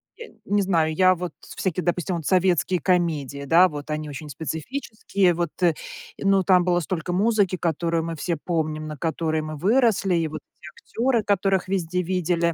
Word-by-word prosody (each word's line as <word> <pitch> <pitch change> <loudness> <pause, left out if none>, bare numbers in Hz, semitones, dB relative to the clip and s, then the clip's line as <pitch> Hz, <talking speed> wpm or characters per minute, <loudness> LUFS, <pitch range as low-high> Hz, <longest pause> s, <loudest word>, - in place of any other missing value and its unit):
и 465 - -11
не 205 +1 +1
знаю, 165 -5 +1
я 185 +2 +4
вот 175 -1 -5
всякие, 180 -1 -3
допустим, 175 +1 -1
вот 160 - -7
советские 180 -2 +2
комедии, 155 -6 0
да, 170 +6 +6
вот 150 -3 -8
они 155 0 -3
очень 150 +1 -8
специфические, 180 - -1
вот, 170 0 -1
и 170 - +5 0.5
но 195 -1 +3
там 180 -1 +4
было 175 -1 +2
столько 175 +1 -3
музыки, 205 -1 +2
которую 165 0 -1
мы 165 0 -4
все 170 +1 -2
помним, 155 -1 -2
на 155 - -6
которой 160 +1 -1
мы 155 0 -6
выросли, 220 - +2
и 165 -2 +1
вот 155 +1 -6 0.2
те 170 - -9 0.3
актёры, 240 -3 +2
которых 195 -2 +1
везде 180 -1 -1
видели. 170 -1 0
175 Hz, 175 wpm, -24 LUFS, 160-190 Hz, 0.5 s, да